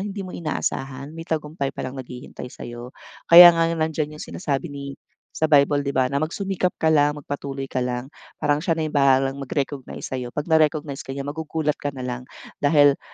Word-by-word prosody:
hindi 200 -1 -5
mo 185 - -8
inaasahan, 140 -3 -3
may 165 +1 -9
tagumpay 150 -3 -2
pa 135 - -6
lang 130 +1 -5
naghihintay 125 0 -9
sa'yo. 120 +1 -9 0.3
Kaya 175 +1 +11
nga 165 0 +2
nandiyan 155 -2 -2
'yong - - -7
sinasabi 145 -2 -3
ni 140 0 -7 0.4
sa 160 - -1
Bible, 145 -1 +4
'di 140 - -2
ba, 130 -1 +2
na 140 - 0
magsumikap 180 +3 -1
ka 160 - +3
lang, 150 -1 +4
magpatuloy 140 -2 -5
ka - - -2
lang. 125 +2 -3 0.3
Parang 145 0 +2
siya 165 +1 0
na 160 - -2
yung 155 -1 -2
bahalang 135 0 +3
mag-recognize 140 0 -4
sa'yo. 125 -2 -4
'Pag 150 +2 -3
na-recognize 155 -3 +1
ka 135 - -5
niya, 140 - -4
magugulat 155 +1 -2
ka 145 - -3
na 130 - -6
lang 125 0 -4 0.4
dahil 145 -1 +4
145 Hz, 190 wpm, -23 LUFS, 135-160 Hz, 0.4 s, Kaya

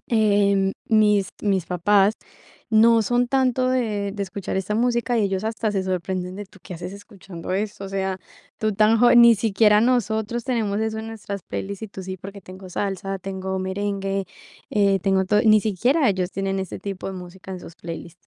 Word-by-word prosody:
em, 200 -3 +3 0.2
mis 210 -3 +3
mis 195 -5 +1
papás 195 +4 +3 0.6
no 225 +1 +5
son 240 +3 +1
tanto 255 -1 +2
de 215 -6 0
de 205 - -3
escuchar 195 0 -4
esta 195 +2 -2
música. 240 +1 +1
Ellos 200 -2 0
hasta 220 0 -1
se 195 -2 -1
sorprenden 185 0 -3
de, 205 -1 -7
¿tú 190 - -19
qué 180 - -8
haces 180 +3 -7
escuchando 195 -4 -9
esto? 200 0 -3
O - - -6
sea, 190 -1 -2 0.4
tú 215 -1 0
tan 215 +2 +4
joven, 240 0 +7
ni 235 -1 +8
siquiera 210 0 +3
nosotros 230 -1 0
tenemos 220 -5 -1
eso 220 0 -2
en 220 - -6
nuestras 205 -3 -6
playlist, 200 +1 -5
y 220 - -5
tú 195 - -8
sí. 185 0 -6
Porque 195 +2 -10
tengo 185 0 -11
salsa, 195 0 -3
tengo 190 0 -4
merengue, 195 +1 -2 0.5
eh, 200 -2 +3
tengo 190 0 +2
todo, 210 +3 +3
ni 215 -1 +6
siquiera 245 - +2
ellos 185 -2 0
tienen 195 0 -2
ese 190 -2 -5
tipo 195 -2 -6
de 195 - -4
música 185 +1 -10
en 185 - -6
sus 165 - -11
playlist. 170 0 -8
200 Hz, 185 wpm, -23 LUFS, 190-220 Hz, 0.6 s, ni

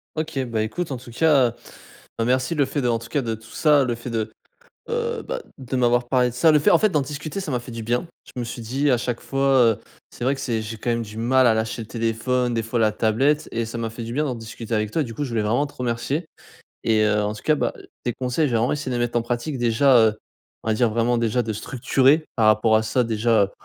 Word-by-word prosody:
OK, 155 -2 -3
bah, 115 -2 -2
écoute 155 +9 -3
en 130 - -2
tout 120 -1 -12
cas, 135 -4 +3 0.7
bah, 115 - +1
merci, 130 +6 +1
le 145 -4 +2
fait, 145 - -3
de 125 - 0
en 115 -1 +1
tout 115 - -11
cas, 145 -3 0
de 115 -1 -2
tout 110 +1 -10
ça, 150 -3 +3
le 120 -2 -1
fait 120 +1 -7
de 110 -1 -2 0.6
heu, 470 0 -2
bah, - - -3 0.2
de 130 0 -4
m'avoir 120 -1 +2
parlé 125 -2 +3
de 115 - -12
ça, 160 +5 +4
le 150 - +5
fait, - - +3
en 170 - +6
fait 215 +4 +3
d'en 150 -5 +2
discuter, 150 +6 -5
ça 175 - -5
m'a 125 - 0
fait 120 0 -10
du 115 -1 -5
bien. 120 +8 -1 0.2
Je - - -12
me 120 - -2
suis 120 0 -6
dit: 135 +6 0
«A 125 - +4
chaque 120 0 -3
fois, 135 -1 +2
heu, - - -8 0.3
c'est - - -11
vrai 135 +2 +1
que - - -8
c'est 115 -5 -1
j'ai 110 +1 -6
quand 115 +3 -3
même 115 0 0
du 105 -1 -9
mal 130 +2 +4
à 110 - +4
lâcher 110 +1 -2
le 110 - -11
téléphone, 120 +2 0
des 115 - 0
fois 115 +2 -2
la 110 -2 +3
tablette» 125 +8 +1
et 115 0 -2
ça 115 +1 -6
m'a 115 -1 -3
fait 115 +1 -7
du 115 - -6
bien 150 +4 0
d'en 125 -4 -2
discuter 115 0 -6
avec 105 -1 -1
toi, 160 - +1
du 115 -5 -6
coup 145 +6 -3
je 130 - -5
voulais 115 -2 0
vraiment 120 +7 +1
te 145 - -15
remercier. 125 +6 -2 0.6
Et 110 -1 +3
heu, 105 0 +2
en 105 +1 -1
tout 105 - -10
cas, 155 - +3
bah, - - -1
heu, - - -13 0.2
tes 120 - 0
conseils, 130 +5 0
je - - -2
vais 115 - +3
vraiment 115 - +1
essayer 145 -3 -3
de 125 - -1
les 120 - +1
mettre 120 - -5
en - - -1
pratique 120 +4 -3
déjà, 120 +2 +4
heu, 110 -1 +3 0.5
on - - -3
va 110 - +3
dire 120 0 +2
vraiment 120 +2 +1
déjà, 115 +1 +1
de 110 -1 -3
structurer, 135 +7 +2
par 110 -2 +3
rapport 110 +1 +4
à 110 - +2
ça 115 +3 +1
déjà 110 -2 +2
120 Hz, 285 wpm, -23 LUFS, 115-135 Hz, 0.7 s, en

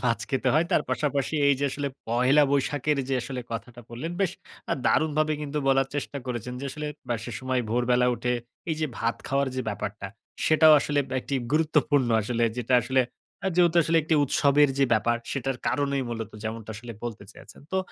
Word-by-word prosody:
মাছ 115 -1 +2
খেতে 135 -1 +1
হয়। 155 +2 +4
তার - - +4
পাশাপাশি 145 0 -1
এই 140 - +5
যে - - +1
আসলে, 140 +1 -3 0.2
পহেলা 125 +5 +4
বৈশাখের 145 +1 +1
যে 135 - +1
আসলে 130 -1 -5
কথাটা 120 +1 -6
বললেন, 125 +8 -5
বেশ 190 -3 +2 0.4
আ - - +3
দারুণভাবে 155 0 +2
কিন্তু 150 0 -3
বলার 135 -1 +4
চেষ্টা 145 0 -3
করেছেন, 125 -1 -4
যে - - -5
আসলে 150 +2 -5 0.2
ব - - -6
সেসময় 130 +1 -2
ভোরবেলা 125 +1 +2
উঠে, 125 +1 -1 0.4
এই 155 - 0
যে 155 - +1
ভাত 115 +1 0
খাওয়ার 140 0 +1
যে 130 - -1
ব্যাপারটা, 105 -1 -4 0.4
সেটাও 155 0 +7
আসলে 145 0 -1
ব - - -17
একটি 140 - -4 0.2
গুরুত্বপূর্ণ। 150 -4 +2
আসলে 120 +2 -1
যেটা 125 +1 +1
আসলে 130 0 +2 0.4
আ - - +3
যেহেতু 175 -1 +4
আসলে 165 +1 +1
একটি 160 +2 +1
উৎসবের 145 +1 +4
যে 140 - +5
ব্যাপার, 120 +2 +2
সেটার 135 -1 -2
কারণেই 140 -1 0
মূলত 115 -2 -4
যেমনটা 110 0 -5
আসলে 115 +2 -8
বলতে 115 -3 -5
চেয়েছেন। - - -15
তো 190 - +2
135 Hz, 190 wpm, -26 LUFS, 120-150 Hz, 0.4 s, সেটাও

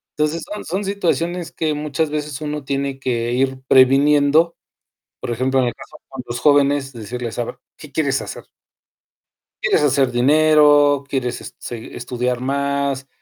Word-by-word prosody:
Entonces, 155 +2 -1
son 210 - -5
son 190 +5 -2
situaciones 175 -3 -1
que 155 -2 -1
muchas 150 +1 -2
veces 150 -1 -4
uno 150 -1 -4
tiene 135 0 -3
que 120 -3 -1
ir 130 +1 0
previniendo. 145 +5 +4 0.7
Por - - -5
ejemplo, 130 +3 +1
en 125 - +1
el 120 - -2
caso - - -13
con 135 -1 -7
los 120 0 -5
jóvenes, 145 -2 +3
decirles: 120 +1 -6
"A 120 - 0
ver, - - -8 0.2
¿qué 150 -3 -13
quieres 140 -3 0
hacer?". - - -8 1.2
"¿quieres - - +2
hacer 135 -3 +2
dinero? 145 +1 +4
¿Quieres 130 -3 -4
seg 115 -2 -8
estudiar 125 0 -2
más? 140 0 -1
140 Hz, 150 wpm, -20 LUFS, 130-150 Hz, 1.2 s, previniendo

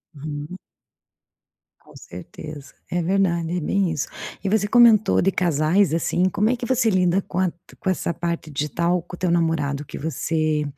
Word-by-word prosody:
Uhum. 150 +4 -6 1.2
Com - - -20
certeza. 145 - -10 0.2
É 175 - -1
verdade, 175 -2 0
é - - 0
bem 190 +2 0
isso. 150 -3 -2 0.4
E 195 - -2
você 205 -1 +2
comentou 225 -2 +5
de 195 - +2
casais, 170 +1 +2
assim, 175 +2 +1
como 210 +4 +1
é 255 - +2
que 245 - -6
você 240 -3 +2
lida 185 -1 +2
com 180 - -5
a 185 -2 +2 0.3
com 190 - -2
essa 180 -2 -1
parte 170 -1 -3
digital 170 +5 0
com 175 - -10
o - - -19
teu 180 - 0
namorado, 150 -4 0
que - - -8
você 155 0 -1
170 Hz, 175 wpm, -22 LUFS, 155-190 Hz, 1.2 s, comentou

